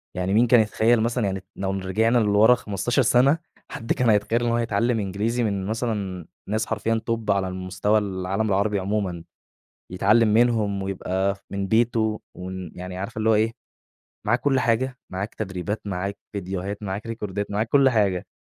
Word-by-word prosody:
يعني 90 Hz, +2 st, -1 dB
مين 120 Hz, +3 st, +4 dB
كان 120 Hz, 0 st, +6 dB
يتخيّل 110 Hz, +1 st, +3 dB
مثلًا 115 Hz, -1 st, 0 dB
يعني 95 Hz, -1 st, -3 dB
لو 95 Hz, 0 st, -2 dB
رجعنا 105 Hz, +5 st, +1 dB
لورا 110 Hz, +2 st, +5 dB
15 115 Hz, +3 st, -1 dB
سنة، 130 Hz, +6 st, +4 dB, 0.3 s
حد 115 Hz, -, -2 dB
كان 125 Hz, -2 st, +1 dB
هيتخيّل 110 Hz, +3 st, +2 dB
إن 120 Hz, -, +1 dB
هو -, -, +2 dB
هيتعلّم 115 Hz, 0 st, +1 dB
إنجليزي 105 Hz, +5 st, -1 dB
من 100 Hz, -3 st, -1 dB
مثلًا 105 Hz, -6 st, -3 dB, 0.2 s
ناس 110 Hz, +1 st, 0 dB
حرفيًا 115 Hz, +1 st, -1 dB
Top 115 Hz, -2 st, -2 dB
على 100 Hz, -1 st, +2 dB
المستوى 95 Hz, +3 st, 0 dB
العالم 95 Hz, +1 st, -2 dB
العربي 100 Hz, +1 st, +1 dB
عمومًا، 95 Hz, -4 st, -2 dB, 0.7 s
يتعلم 110 Hz, +5 st, +4 dB
منهم 110 Hz, -4 st, +2 dB
ويبقى 95 Hz, 0 st, -1 dB
ف -, -, -19 dB
من 100 Hz, 0 st, -2 dB
بيتُه 110 Hz, -1 st, +1 dB, 0.2 s
ومن 90 Hz, -2 st, -6 dB
يعني 90 Hz, 0 st, -7 dB
عارفة 100 Hz, +3 st, -5 dB
اللي 110 Hz, +1 st, +2 dB
هو -, -, +5 dB
إيه، 110 Hz, +2 st, +2 dB, 0.7 s
معاك 120 Hz, +3 st, +2 dB
كُلّ 135 Hz, -1 st, +2 dB
حاجة، 125 Hz, +2 st, 0 dB
معاك 95 Hz, +3 st, -4 dB
تدريبات، 95 Hz, 0 st, -4 dB
معاك 100 Hz, +1 st, -3 dB
فيديوهات، 100 Hz, +1 st, -4 dB
معاك 100 Hz, +3 st, -4 dB
ريكوردات 105 Hz, -3 st, -4 dB
معاك 110 Hz, +2 st, -1 dB
كُلّ 140 Hz, 0 st, +5 dB
حاجة، 100 Hz, -6 st, +1 dB
105 Hz, 170 wpm, -24 LUFS, 95-115 Hz, 0.7 s, كان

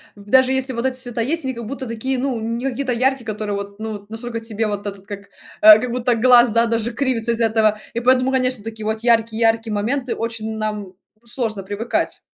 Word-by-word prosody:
даже 255 Hz, +6 st, +3 dB
если 265 Hz, 0 st, +1 dB
вот 235 Hz, +1 st, -3 dB
эти 260 Hz, -1 st, 0 dB
цвета 245 Hz, -2 st, -3 dB
есть, 320 Hz, +8 st, 0 dB
они, 260 Hz, -1 st, -2 dB
как 235 Hz, -1 st, -7 dB
будто 260 Hz, +2 st, -6 dB
такие, 245 Hz, +4 st, -2 dB
ну, 255 Hz, -2 st, -1 dB
не 230 Hz, +3 st, -3 dB
какие-то 255 Hz, 0 st, -2 dB
яркие, 260 Hz, +1 st, 0 dB
которые 210 Hz, -1 st, -3 dB
вот, 200 Hz, +1 st, -7 dB
ну 220 Hz, 0 st, -4 dB
вот, 205 Hz, 0 st, -10 dB
насколько 230 Hz, +1 st, -5 dB
тебе 225 Hz, -1 st, -2 dB
вот 205 Hz, -1 st, -4 dB
этот, 195 Hz, -1 st, -8 dB
как, 200 Hz, -1 st, -6 dB, 0.4 s
э, 215 Hz, 0 st, +10 dB
как 250 Hz, +1 st, -3 dB
будто 245 Hz, 0 st, +1 dB
глаз, 245 Hz, +1 st, +6 dB
да, 230 Hz, +1 st, +3 dB
даже 230 Hz, 0 st, -1 dB
кривится 240 Hz, -3 st, -1 dB
из-за 230 Hz, 0 st, +1 dB
этого. 215 Hz, -1 st, +2 dB
И 235 Hz, -, -1 dB
поэтому, 255 Hz, +2 st, +3 dB
конечно, 255 Hz, -4 st, 0 dB
такие 220 Hz, -1 st, -7 dB
вот 220 Hz, +1 st, -1 dB
яркие 230 Hz, -1 st, +2 dB
яркие 225 Hz, -1 st, +2 dB
моменты 245 Hz, +5 st, -1 dB
очень 225 Hz, -1 st, -4 dB
нам, 215 Hz, -1 st, -2 dB
ну, 185 Hz, -1 st, -15 dB, 0.3 s
сложно 230 Hz, -4 st, -3 dB
привыкать. 205 Hz, +4 st, -2 dB
230 Hz, 220 wpm, -20 LUFS, 215-250 Hz, 0.4 s, э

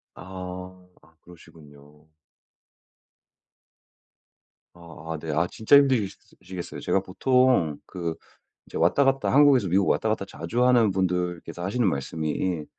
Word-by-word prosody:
아. 90 Hz, 0 st, -9 dB, 0.2 s
아 80 Hz, -, -25 dB
그러시군요. 75 Hz, -3 st, -18 dB, 2.7 s
아 80 Hz, -2 st, -10 dB
아. -, -, -5 dB
네. 80 Hz, 0 st, -5 dB
아. 80 Hz, +4 st, +1 dB
진짜 110 Hz, +6 st, +4 dB
힘드시 130 Hz, -8 st, +3 dB, 0.3 s
시겠어요. 90 Hz, -1 st, -8 dB
제가 95 Hz, -, +1 dB
보통 100 Hz, -, +2 dB
그 85 Hz, -3 st, -4 dB, 0.5 s
이제 -, -, -10 dB
왔다 90 Hz, +12 st, +3 dB
갔다 135 Hz, 0 st, +1 dB
한국에서 135 Hz, -7 st, +5 dB
미국 95 Hz, +3 st, +2 dB
왔다 110 Hz, -, +1 dB
갔다 110 Hz, -2 st, -1 dB
자주 120 Hz, +5 st, -2 dB
하는 120 Hz, -4 st, +4 dB
분들께서 90 Hz, -2 st, -2 dB
하시는 110 Hz, +5 st, 0 dB
말씀이 80 Hz, +3 st, -3 dB
90 Hz, 260 characters per minute, -25 LUFS, 80-110 Hz, 2.7 s, 한국에서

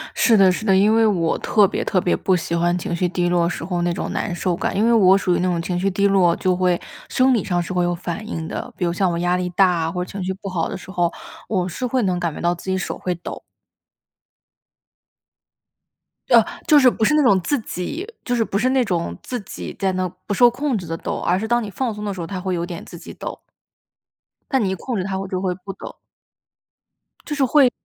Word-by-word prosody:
是 230 Hz, -3 st, +4 dB
的， 190 Hz, -2 st, +6 dB
是 215 Hz, +4 st, -4 dB
的， 195 Hz, -, +4 dB
因 205 Hz, +3 st, +4 dB
为 225 Hz, 0 st, +4 dB
我 175 Hz, -6 st, +1 dB
特 210 Hz, -2 st, +4 dB
别 -, -, -2 dB
特 185 Hz, -, +1 dB
别 175 Hz, -, +1 dB
不 190 Hz, -, +1 dB
喜 170 Hz, -1 st, -2 dB
欢 175 Hz, +1 st, +2 dB
情 175 Hz, -1 st, -3 dB
绪 180 Hz, +1 st, +1 dB
低 175 Hz, 0 st, 0 dB
落 175 Hz, -1 st, +2 dB
时 175 Hz, -, -5 dB
候 175 Hz, -1 st, -2 dB
那 175 Hz, 0 st, +1 dB
种 180 Hz, -, -4 dB
难 190 Hz, -, -2 dB
受 175 Hz, 0 st, -1 dB
感， -, -, -2 dB
因 210 Hz, +3 st, +2 dB
为 235 Hz, -, +4 dB
我 195 Hz, -4 st, +6 dB
属 180 Hz, -2 st, +1 dB
于 -, -, 0 dB
那 185 Hz, -, +1 dB
种 175 Hz, -2 st, 0 dB
情 175 Hz, +1 st, -2 dB
绪 195 Hz, +2 st, +1 dB
低 200 Hz, +2 st, +2 dB
落， 185 Hz, -4 st, +4 dB
就 185 Hz, -1 st, +1 dB
会 180 Hz, -1 st, +1 dB, 0.3 s
生 260 Hz, 0 st, +3 dB
理 225 Hz, -, +1 dB
上 175 Hz, -2 st, 0 dB
是 175 Hz, -, -5 dB
会 180 Hz, -1 st, +1 dB
有 175 Hz, 0 st, +1 dB
反 175 Hz, +4 st, -5 dB
应 165 Hz, -7 st, -4 dB
的。 -, -, -5 dB
比 180 Hz, -, -1 dB
如 170 Hz, -, 0 dB
像 185 Hz, 0 st, +1 dB
我 170 Hz, -, -2 dB
压 175 Hz, +1 st, +1 dB
力 180 Hz, 0 st, -1 dB
大， 175 Hz, -3 st, +2 dB
或 180 Hz, +1 st, -2 dB
者 -, -, -10 dB
情 195 Hz, -1 st, -5 dB
绪 190 Hz, +1 st, -2 dB
不 195 Hz, +1 st, -9 dB
好 170 Hz, -3 st, -1 dB
的 -, -, -4 dB
时 190 Hz, -, -13 dB
候， 175 Hz, -3 st, +1 dB, 0.4 s
我 185 Hz, -4 st, 0 dB
是 250 Hz, +8 st, -4 dB
会 250 Hz, +1 st, 0 dB
能 180 Hz, -3 st, 0 dB
感 170 Hz, -3 st, -1 dB
觉 -, -, -8 dB
到 175 Hz, +1 st, +1 dB
自 170 Hz, -, -13 dB
己 190 Hz, -, +1 dB
手 185 Hz, -, -4 dB
会 180 Hz, -, -2 dB
抖。 175 Hz, -, -8 dB, 2.9 s
呃， 235 Hz, -2 st, +7 dB, 0.2 s
就 305 Hz, -3 st, +6 dB
是 260 Hz, -2 st, +7 dB
不 230 Hz, -, -3 dB
是 215 Hz, -, +4 dB
那 305 Hz, -, +4 dB
种 200 Hz, -7 st, +5 dB
自 290 Hz, +10 st, 0 dB
己 230 Hz, -, -5 dB, 0.2 s
就 245 Hz, -, -2 dB
是 235 Hz, -, +2 dB
不 200 Hz, -, -2 dB
是 245 Hz, +5 st, +2 dB
那 260 Hz, -1 st, +3 dB
种 165 Hz, -, -2 dB
自 250 Hz, -, -4 dB
己 195 Hz, -, -8 dB
在 195 Hz, -1 st, 0 dB
那 185 Hz, 0 st, -1 dB, 0.2 s
不 205 Hz, -, -2 dB
受 240 Hz, +4 st, +6 dB
控 260 Hz, +1 st, -1 dB
制 180 Hz, -4 st, -7 dB
地 165 Hz, -, -3 dB
抖， -, -, -4 dB
而 175 Hz, -, +1 dB
是 220 Hz, +3 st, -3 dB
当 240 Hz, +1 st, +2 dB
你 215 Hz, -, -5 dB
放 235 Hz, +3 st, -2 dB
松 210 Hz, 0 st, -6 dB
的 205 Hz, -, -2 dB
时 185 Hz, -, -6 dB
候， 165 Hz, -, -5 dB
它 190 Hz, 0 st, -4 dB
会 185 Hz, 0 st, -2 dB
有 170 Hz, 0 st, -2 dB
点 175 Hz, -2 st, -7 dB
自 170 Hz, -, -10 dB
己 -, -, -10 dB
抖。 -, -, -6 dB, 1.1 s
但 265 Hz, -5 st, +2 dB
你 195 Hz, -, 0 dB
一 -, -, -1 dB
控 245 Hz, +6 st, -4 dB
制 185 Hz, -, -1 dB
它， 190 Hz, 0 st, -3 dB
我 195 Hz, -, -4 dB
就 185 Hz, -1 st, -3 dB
会 185 Hz, -2 st, 0 dB
不 190 Hz, +2 st, -8 dB
抖。 -, -, -10 dB, 1.3 s
就 295 Hz, -, -3 dB
是 285 Hz, -, +1 dB
会 260 Hz, -1 st, +5 dB
185 Hz, 280 characters per minute, -21 LUFS, 175-215 Hz, 2.9 s, 呃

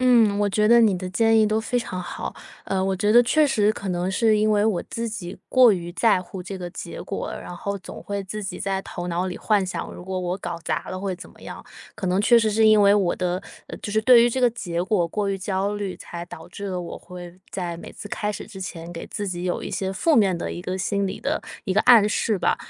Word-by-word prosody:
嗯， 230 Hz, -5 st, +4 dB
我 205 Hz, 0 st, +2 dB
觉 210 Hz, +2 st, +2 dB
得 235 Hz, +1 st, +7 dB
你 210 Hz, -5 st, +4 dB
的 185 Hz, 0 st, -5 dB
建 225 Hz, +3 st, +3 dB
议 220 Hz, -, +5 dB
都 215 Hz, +1 st, +1 dB
非 245 Hz, +2 st, -2 dB
常 205 Hz, -6 st, -3 dB
好。 180 Hz, -, -5 dB, 0.3 s
呃， 190 Hz, -1 st, -1 dB
我 195 Hz, -, +1 dB
觉 205 Hz, +3 st, +1 dB
得 240 Hz, -, +8 dB
确 310 Hz, +5 st, +4 dB
实 215 Hz, -7 st, +2 dB
可 200 Hz, -, -6 dB
能 180 Hz, 0 st, -1 dB
是 215 Hz, +2 st, +3 dB
因 215 Hz, +1 st, +2 dB
为 205 Hz, 0 st, +3 dB
我 210 Hz, -6 st, +1 dB
自 230 Hz, 0 st, -4 dB
己 180 Hz, -5 st, -6 dB
过 250 Hz, -4 st, +6 dB
于 175 Hz, -2 st, -3 dB
在 185 Hz, 0 st, +3 dB
乎 185 Hz, +1 st, -8 dB
这 190 Hz, +2 st, -6 dB
个 180 Hz, -1 st, -6 dB
结 -, -, -7 dB
果， -, -, -4 dB
然 180 Hz, -, -7 dB
后 200 Hz, +3 st, -3 dB
总 190 Hz, -, -10 dB
会 200 Hz, -1 st, -4 dB
自 210 Hz, +3 st, -6 dB
己 195 Hz, -, -5 dB
在 195 Hz, -1 st, -1 dB
头 175 Hz, -2 st, -6 dB
脑 175 Hz, +2 st, -1 dB
里 180 Hz, -, -4 dB
幻 205 Hz, -3 st, +1 dB
想， 185 Hz, -, -5 dB
如 175 Hz, -, -10 dB
果 190 Hz, 0 st, -3 dB
我 180 Hz, +1 st, -2 dB
搞 175 Hz, -2 st, -4 dB
砸 155 Hz, -2 st, -2 dB
了 185 Hz, -, -5 dB
会 190 Hz, -2 st, -3 dB
怎 -, -, -11 dB
么 -, -, -20 dB
样。 -, -, -9 dB, 0.3 s
可 190 Hz, -, -4 dB
能 185 Hz, +2 st, +2 dB
确 235 Hz, +3 st, +6 dB
实 225 Hz, -1 st, +2 dB
是 220 Hz, +1 st, +3 dB
因 215 Hz, -1 st, +6 dB
为 200 Hz, 0 st, +6 dB
我 195 Hz, -4 st, +1 dB
的 180 Hz, +1 st, -1 dB, 0.4 s
就 205 Hz, -, -4 dB
是 215 Hz, +1 st, +2 dB
对 240 Hz, 0 st, +7 dB
于 240 Hz, -, +3 dB
这 260 Hz, -, -1 dB
个 245 Hz, -, +5 dB
结 175 Hz, -7 st, -4 dB
果 185 Hz, -4 st, +1 dB
过 205 Hz, +3 st, -1 dB
于 195 Hz, -, 0 dB
焦 195 Hz, +2 st, -1 dB
虑， 200 Hz, -2 st, -4 dB
才 170 Hz, 0 st, -7 dB
导 160 Hz, -1 st, -10 dB
致 200 Hz, +3 st, -7 dB
了 185 Hz, -2 st, -3 dB
我 175 Hz, -, -6 dB
会 180 Hz, 0 st, -10 dB
在 175 Hz, -3 st, -4 dB
每 170 Hz, -, -10 dB
次 -, -, -9 dB
开 210 Hz, +1 st, -2 dB
始 210 Hz, -, -6 dB
之 190 Hz, -, -10 dB
前， 170 Hz, -2 st, -6 dB
给 165 Hz, -, -6 dB
自 205 Hz, -, -4 dB
己 175 Hz, -2 st, -4 dB
有 180 Hz, -, -1 dB
一 -, -, -4 dB
些 190 Hz, 0 st, -2 dB
负 305 Hz, -, +2 dB
面 195 Hz, -8 st, +4 dB
的 -, -, -4 dB
一 175 Hz, -, -6 dB
个 185 Hz, +1 st, -3 dB
心 200 Hz, +2 st, 0 dB
理 190 Hz, -, -5 dB
的 -, -, -2 dB, 0.2 s
一 190 Hz, -, -1 dB
个 215 Hz, -, +5 dB
暗 230 Hz, -4 st, +7 dB
示 210 Hz, 0 st, 0 dB
吧。 -, -, +2 dB
195 Hz, 290 characters per minute, -24 LUFS, 180-215 Hz, 0.4 s, 得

